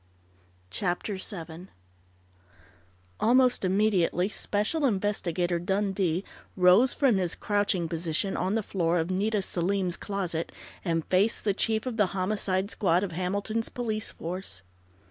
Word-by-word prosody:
CHAPTER 190 - -2
SEVEN 175 -2 -7 1.5
Almost 250 0 +4
immediately 190 -2 +2
Special 210 +10 -1
Investigator 180 -5 0
Dundee 190 -1 0 0.3
rose 185 +8 +6
from 260 -8 +3
his 180 -3 0
crouching 205 -4 0
position 165 +3 -1
on 190 +3 0
the 225 - 0
floor 175 -3 0
of 165 +2 -1
Nita 205 +2 +1
Selim's 185 0 -1
closet, 180 -5 -3 0.3
and 165 -3 -1
faced 200 +5 +2
the 205 - +2
chief 220 +3 0
of 250 -3 -3
the 210 -3 +4
Homicide 190 0 0
Squad 180 -2 +2
of 195 - -3
Hamilton's 200 +6 -1
police 220 -3 -3
force. 170 - -7
190 Hz, 125 wpm, -28 LUFS, 175-210 Hz, 1.5 s, rose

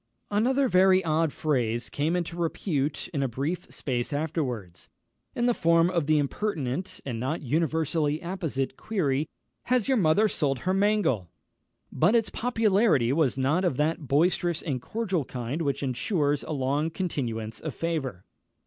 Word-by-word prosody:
Another 260 +6 +2
very 185 -2 +4
odd 160 0 +2
phrase 120 -7 -1
came 155 +4 -1
into 175 -1 -2
repute 155 -4 -1
in 145 -6 -2
a 135 - +1
brief 140 +9 -3
space 120 -1 -3
afterwards, 135 - -3 0.5
in 240 - 0
the 245 - +4
form 170 -2 +3
of 170 -5 0
the 155 0 +4
impertinent 150 0 -2
and 120 -4 -3
not 135 +7 -2
universally 155 +1 0
apposite 160 -7 -3
query, 155 -9 -1 0.4
"Has 250 -3 +1
your 265 -2 +3
mother 195 +3 +4
sold 135 -9 -1
her 185 - 0
mangle?" 195 - +1 0.6
But 225 - +3
its 225 -2 +2
popularity 215 - +2
was 140 -5 +2
not 145 +8 +1
of 175 -9 +1
that 155 0 0
boisterous 170 +4 +2
and 135 -7 -2
cordial 195 - -1
kind 125 +5 -4
which 140 -2 -1
ensures 145 - 0
a - - -6
long 145 +2 0
continuance 120 - -3
of 155 -5 -5
favour. 145 - -3
155 Hz, 150 wpm, -27 LUFS, 135-180 Hz, 0.6 s, very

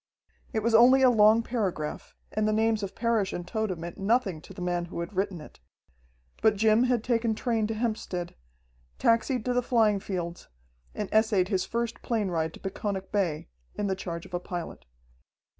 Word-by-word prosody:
It 220 - -1
was 230 0 +1
only 255 +4 +7
a 255 - +7
long 220 0 +5
paragraph, 195 -11 -3 0.2
and 215 0 0
the - - +2
names 220 0 +2
of 200 -2 -5
Parrish 225 -4 0
and 175 0 -5
Tode 215 -2 -2
meant 170 +4 -7
nothing 195 -5 +1
to 175 - -14
the 195 - -10
man 175 -1 -1
who 170 - -7
had 170 +4 -6
written 190 -2 -1
it. 150 - -13 0.8
But 220 -1 +4
Jim 220 +3 +4
had 245 -3 +1
taken 230 -2 +1
train 225 -2 0
to 225 - -3
Hempstead, 215 -6 -3 0.6
taxied 230 +1 +2
to 250 - +1
the 245 - +2
flying 225 -4 +2
fields, 175 -3 -5 0.5
and 210 - -3
essayed 215 -4 +3
his 190 -3 0
first 235 0 -3
plane 220 -5 -1
ride 160 -2 -1
to - - -12
Peconic 195 0 -4
Bay, 175 -7 -1 0.3
in 205 - -2
the 190 -1 0
charge 170 -3 -6
of - - -15
a 175 - 0
pilot. 175 -1 -6
210 Hz, 190 wpm, -28 LUFS, 180-230 Hz, 0.8 s, only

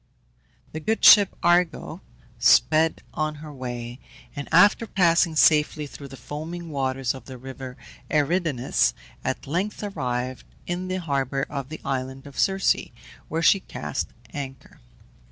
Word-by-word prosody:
The 155 - -5
good 220 +8 0
ship 205 -3 +8
Argo 175 -1 +1 0.4
sped 160 +1 +4
on 155 -1 -2
her 150 0 -10
way, 120 -2 -6 0.4
and, 145 -1 -6
after 205 +7 +5
passing 170 -3 +3
safely 150 -1 +4
through 140 0 -10
the 135 0 -11
foaming 165 +4 -7
waters 135 -3 -1
of 130 -3 -11
the 130 -1 -9
river 130 0 -9 0.3
Eridanus, 145 - +1 0.3
at - - -3
length 185 +9 -2
arrived 130 -9 -3 0.2
in 180 +1 -3
the 185 0 -2
harbour 135 -3 -1
of 140 -2 -4
the 155 - -7
island 130 0 -3
of 140 -2 -9
Circe, 195 -1 +3 0.5
where 165 +1 -1
she 195 - +6
cast - - -4 0.3
anchor. 135 -2 -8
150 Hz, 135 wpm, -24 LUFS, 130-170 Hz, 0.5 s, ship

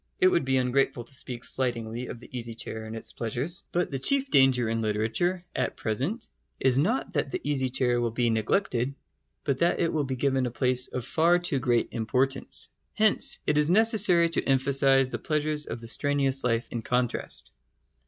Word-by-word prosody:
It 185 - +5
would 170 -6 +1
be 130 0 +1
ungrateful 125 -1 0
to 120 - -14
speak 125 -2 -5
slightingly 120 -1 -2
of 120 - -8
the 125 - -13
easy 115 -2 -5
chair 110 -1 -5
and 110 +1 -7
its 115 - -5
pleasures. 125 - -2
But 175 -2 -1
the 135 - -3
chief 275 - 0
danger 130 -3 +4
in 115 0 -1
literature 110 - -1
at - - -2
present 135 - -2 0.3
is 130 0 +3
not 220 - 0
that - - 0
the 370 - -3
easy 130 -3 -1
chair 125 -1 +1
will 120 - 0
be 120 +1 0
neglected, 120 - 0 0.5
but 140 -3 -1
that 170 - +2
it 165 - 0
will 150 -3 0
be 130 0 -3
given 130 -1 0
a - - -3
place 125 +1 +1
of 125 -2 -5
far 165 +6 +3
too 175 -6 -1
great 120 -2 +1
importance. 130 +4 -1 0.3
Hence 215 -1 +4
it 150 0 +2
is 150 +1 +2
necessary 200 -4 +5
to 165 - 0
emphasise 135 0 +4
the - - -3
pleasures 150 -1 0
of 115 - -6
the 115 - -9
strenuous 135 +2 0
life 115 -1 0
in 120 - -4
contrast. 125 +1 -2
130 Hz, 195 wpm, -27 LUFS, 120-150 Hz, 0.5 s, It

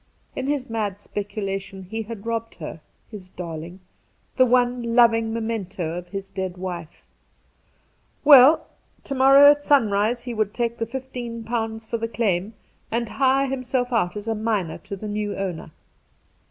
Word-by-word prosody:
In 265 - -3
his 285 -3 -1
mad 210 -4 -3
speculation 195 -2 -5
he 220 +5 -5
had 220 -1 -8
robbed 230 0 -3
her 160 -1 -8
— - - -39
his 195 -4 -10
darling, 170 +1 -7 0.5
the 255 -1 +5
one 245 -1 +1
loving 230 -2 +4
memento 215 -7 -3
of 175 0 -6
his 195 +1 -6
dead 190 -2 -4
wife! 175 -3 -7 1.2
Well, 285 +1 +8 0.4
to 275 - -5
morrow 275 +2 +8
at 290 0 0
sunrise 230 -4 +2
he 245 -1 -5
would 215 -2 -1
take 235 -1 -2
the 230 - -1
£15 230 -3 -5
for 230 - -2
the 230 - -2
claim, 210 -3 -1 0.3
and 235 0 -2
hire 270 0 +2
himself 255 -1 -2
out 210 -4 +1
as 205 +1 -7
a 225 - +1
miner 210 -7 -2
to 200 - -7
the 210 +2 -7
new 205 0 -3
owner. 185 -5 -4
225 Hz, 155 wpm, -23 LUFS, 195-245 Hz, 1.2 s, Well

